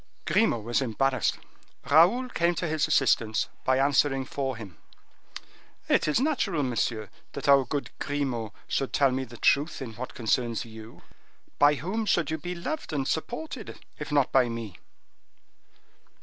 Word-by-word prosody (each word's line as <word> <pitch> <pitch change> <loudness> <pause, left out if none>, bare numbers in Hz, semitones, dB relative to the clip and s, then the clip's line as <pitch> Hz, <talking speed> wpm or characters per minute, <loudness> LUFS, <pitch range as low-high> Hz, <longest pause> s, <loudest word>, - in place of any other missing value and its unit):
Grimaud 170 - +2
was 120 +3 +1
embarrassed; 130 +1 0 0.5
Raoul 180 - +5
came 170 -5 +1
to 170 - -2
his 155 -1 0
assistance, 120 -7 +2
by 130 0 +2
answering 135 0 +2
for 135 -2 -3
him. 100 -8 -10 1.1
"It - - +3
is 150 - +2
natural, 235 - 0
monsieur, 115 -3 -1 0.2
that 140 - -5
our 140 -2 +6
good 140 +3 -3
Grimaud 130 -7 -2 0.2
should 135 - -1
tell 140 -2 +4
me 130 +1 -2
the 120 -1 -12
truth 145 +7 +2
in 125 -5 -6
what 125 +4 -7
concerns 120 0 0
you. 110 0 -12 0.6
By 145 +1 +6
whom 210 +9 -3
should 170 -5 +2
you 160 - -2
be 180 +3 -5
loved 290 - -4
an 140 -2 -1
supported, 240 - -4 0.2
if 150 0 -6
not 145 -3 +2
by 130 -2 +4
me?" 115 -6 -6
140 Hz, 150 wpm, -27 LUFS, 120-160 Hz, 1.1 s, our